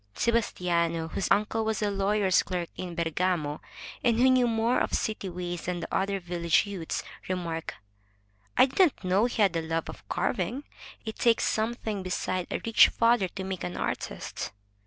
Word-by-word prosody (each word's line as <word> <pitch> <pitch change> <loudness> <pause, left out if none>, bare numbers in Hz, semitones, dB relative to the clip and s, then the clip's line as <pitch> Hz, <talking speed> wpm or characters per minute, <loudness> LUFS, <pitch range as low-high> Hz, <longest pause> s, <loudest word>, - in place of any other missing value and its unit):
Sebastiano, 170 -8 +1
whose 190 - -2
uncle 215 +2 +2
was 220 -1 -1
a 205 - +1
lawyer's 195 -1 +2
clerk 175 -2 -3
in 180 -2 -6
Bergamo, 165 -2 0 0.4
and 235 -2 +3
who 260 +2 +5
knew 255 -1 +4
more 230 +2 +2
of - - 0
city 215 -3 -2
ways 175 -1 -5
than 180 -1 -2
the 165 - -4
other 195 +1 0
village 170 -1 +1
youths, 190 -5 -4 0.3
re 185 - +1
marked: 165 -2 -4 0.8
"I - - +8
didn't 280 - +2
know 185 +4 +3
he 240 - -3
had 195 -3 +3
the 165 - 0
love 165 0 -2
of - - -11
carving. 190 +8 -1 0.4
It 220 - -6
takes 230 -1 +4
something 220 -2 -1
beside 185 0 -2
a - - -2
rich 230 -1 +7
father 230 -4 +3
to 190 - -6
make 190 -1 -4
an 90 0 -4
artist." - - -4
190 Hz, 175 wpm, -28 LUFS, 175-220 Hz, 0.8 s, I